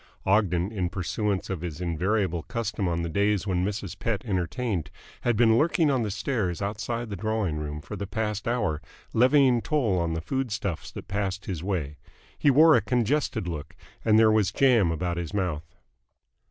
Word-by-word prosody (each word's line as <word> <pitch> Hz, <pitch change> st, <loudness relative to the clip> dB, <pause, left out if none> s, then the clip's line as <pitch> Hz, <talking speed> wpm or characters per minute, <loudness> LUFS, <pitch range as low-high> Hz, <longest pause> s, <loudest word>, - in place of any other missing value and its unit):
Ogden, 95 Hz, -2 st, +2 dB
in 95 Hz, -5 st, -1 dB
pursuance 95 Hz, +2 st, -2 dB
of 90 Hz, -4 st, -3 dB
his 85 Hz, -3 st, -5 dB
invariable 90 Hz, +1 st, 0 dB
custom 110 Hz, -1 st, -3 dB
on 85 Hz, -1 st, -1 dB
the -, -, -2 dB
days 100 Hz, +3 st, +1 dB
when 90 Hz, -3 st, 0 dB
Mrs. 100 Hz, -1 st, -4 dB
Pett 115 Hz, -2 st, -2 dB
entertained, 95 Hz, -, -2 dB, 0.3 s
had 120 Hz, -3 st, +1 dB
been 115 Hz, 0 st, +5 dB
lurking 160 Hz, -1 st, +3 dB
on 130 Hz, -3 st, +1 dB
the 110 Hz, -, -1 dB
stairs 100 Hz, -4 st, -1 dB
outside 110 Hz, +3 st, -3 dB
the -, -, -2 dB
drawing 110 Hz, -6 st, -1 dB
room 75 Hz, 0 st, -5 dB
for 105 Hz, -, -7 dB
the 100 Hz, 0 st, -5 dB
past 105 Hz, 0 st, -3 dB
hour, 105 Hz, -11 st, 0 dB, 0.3 s
levying 130 Hz, 0 st, +4 dB
toll 120 Hz, -, +1 dB
on 85 Hz, -1 st, -1 dB
the -, -, -2 dB
food 130 Hz, +5 st, -2 dB
stuffs 100 Hz, -5 st, -3 dB
that -, -, -9 dB
passed 100 Hz, 0 st, -2 dB
his 90 Hz, -6 st, -4 dB
way. 80 Hz, -7 st, -2 dB, 0.4 s
He 145 Hz, -, +3 dB
wore 155 Hz, +3 st, +7 dB
a 120 Hz, -, +4 dB
congested 120 Hz, -1 st, 0 dB
look, 80 Hz, -4 st, -6 dB, 0.3 s
and 110 Hz, -1 st, +4 dB
there 110 Hz, -1 st, +6 dB
was 110 Hz, -3 st, +2 dB
jam 120 Hz, -9 st, +4 dB
about 85 Hz, +1 st, -2 dB
his 85 Hz, +3 st, -4 dB
mouth. 80 Hz, -6 st, -3 dB
100 Hz, 180 wpm, -26 LUFS, 90-115 Hz, 0.4 s, wore